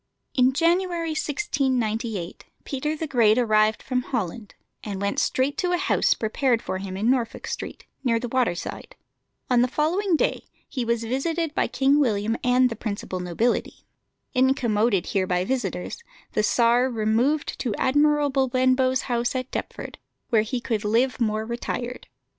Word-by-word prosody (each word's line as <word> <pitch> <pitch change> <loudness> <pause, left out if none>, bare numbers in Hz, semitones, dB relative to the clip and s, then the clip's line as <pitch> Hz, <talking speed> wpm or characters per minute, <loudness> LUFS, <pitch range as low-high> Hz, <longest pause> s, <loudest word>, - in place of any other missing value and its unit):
In 255 0 +4
January 340 +1 +1
1698 245 - -2 0.2
Peter 300 +3 -2
the 320 - -3
Great 235 -6 +3
arrived 215 -3 +3
from 255 -1 0
Holland, 220 -4 -4 0.3
and 200 -3 -4
went 200 0 0
straight 265 +2 0
to 360 -1 +1
a - - +3
house - - +2
prepared 235 +2 +1
for 190 - -3
him 190 -1 -5
in 210 +4 0
Norfolk 240 -3 -1
Street, - - -6 0.2
near 230 -3 +2
the 245 - -4
water 240 -7 +1
side. - - -7 0.5
On 245 -2 +3
the 250 - +3
following 335 +8 +1
day - - 0 0.2
he 255 - -3
was 235 0 0
visited 310 +7 -1
by - - +1
King 270 +4 +3
William 220 -4 +1
and 250 0 +4
the - - -3
principal 200 -4 -4
nobility. 180 +7 -1 0.5
Incommoded 240 - +2
here 190 -2 0
by 180 0 0
visitors, 230 - -3 0.3
the - - +2
Czar 240 +3 +3
removed 235 +6 0
to 230 -6 -1
Admiral 290 +1 +3
Benbow's 260 -1 +2
house 240 +1 -1
at 255 0 -3
Deptford, - - -6 0.3
where 225 -2 +4
he 235 +3 -2
could 225 -3 -2
live 240 +5 +1
more 215 -1 0
retired. 240 +1 -4
245 Hz, 155 wpm, -24 LUFS, 220-270 Hz, 0.5 s, In